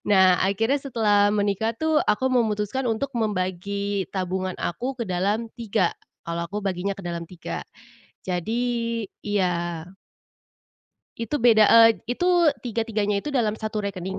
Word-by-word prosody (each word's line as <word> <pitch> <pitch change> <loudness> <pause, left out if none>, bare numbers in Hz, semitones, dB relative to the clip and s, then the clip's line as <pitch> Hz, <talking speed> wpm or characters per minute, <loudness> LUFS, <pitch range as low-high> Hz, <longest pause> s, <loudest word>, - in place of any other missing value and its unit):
Nah, 190 -3 +5
akhirnya 225 +8 +1
setelah 210 -6 +2
menikah 205 +2 0
tuh 315 -1 +1
aku 210 +5 +1
memutuskan 225 0 0
untuk 225 +5 -1
membagi 200 -1 -1
tabungan 185 0 -2
aku 250 +10 -2
ke - - 0
dalam 200 +6 0
3, 200 -6 0 0.4
kalau 170 0 -2
aku 205 +3 -4
baginya 195 0 -2
ke 195 - -9
dalam 170 -1 -4
3. 175 +1 -7 0.6
Jadi 200 +7 -1 0.6
iya. 175 -5 -1 1.3
Itu 230 +6 -2
beda, 225 -3 +6
eee, 225 -4 +6
itu 350 +9 0 0.3
tiga-tiganya 220 -3 -1
itu 295 - -4
dalam 235 -6 +1
1 215 0 -4
rekening, 190 -1 -4
205 Hz, 130 wpm, -24 LUFS, 185-230 Hz, 1.3 s, beda